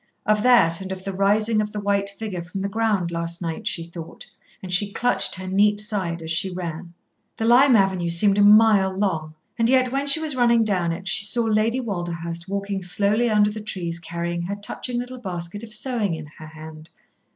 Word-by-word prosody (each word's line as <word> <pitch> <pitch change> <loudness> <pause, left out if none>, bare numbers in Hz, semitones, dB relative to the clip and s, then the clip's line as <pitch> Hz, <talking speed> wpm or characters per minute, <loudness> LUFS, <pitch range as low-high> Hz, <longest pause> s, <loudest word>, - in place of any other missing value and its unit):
Of 215 -1 +2
that, 200 -9 +4
and 190 0 -7
of 190 0 -6
the 195 0 -5
rising 210 +3 +1
of 210 0 -5
the 210 - -3
white 200 -1 0
figure 200 -3 -6
from 180 +3 -6
the 200 - -1
ground 205 -4 -1
last 170 0 -3
night 165 -2 -5
she 165 - -1
thought, 170 -1 -10 0.4
and 185 -1 -3
she 200 +3 +2
clutched 245 +4 0
her 185 0 -7
neat 205 +2 +2
side 190 -6 -1
as 160 - -5
she 175 +4 0
ran. 175 -1 -7 0.4
The 225 - -2
Lime 250 +3 +6
Avenue 190 -4 +1
seemed 195 +4 +3
a - - +5
mile 205 -2 +5
long, 165 -6 -2 0.2
and 230 0 +2
yet 255 -1 +3
when 275 +2 -2
she 280 +3 +5
was 310 -3 -2
running 235 -2 +3
down 185 -6 0
it 185 +3 -6
she 195 - +5
saw 235 +3 +3
Lady 225 +2 +1
Walderhurst 175 -5 -5
walking 200 0 -3
slowly 205 +6 +1
under 210 -1 +3
the 215 +1 -7
trees 175 -5 -4
carrying 170 +1 -4
her 185 +4 -4
touching 240 +4 -3
little 250 +1 -5
basket 180 -2 -6
of 230 -1 -10
sewing 215 -5 -1
in 160 -1 -8
her 155 - -10
hand. 155 0 -12
200 Hz, 205 wpm, -22 LUFS, 170-215 Hz, 0.4 s, Lime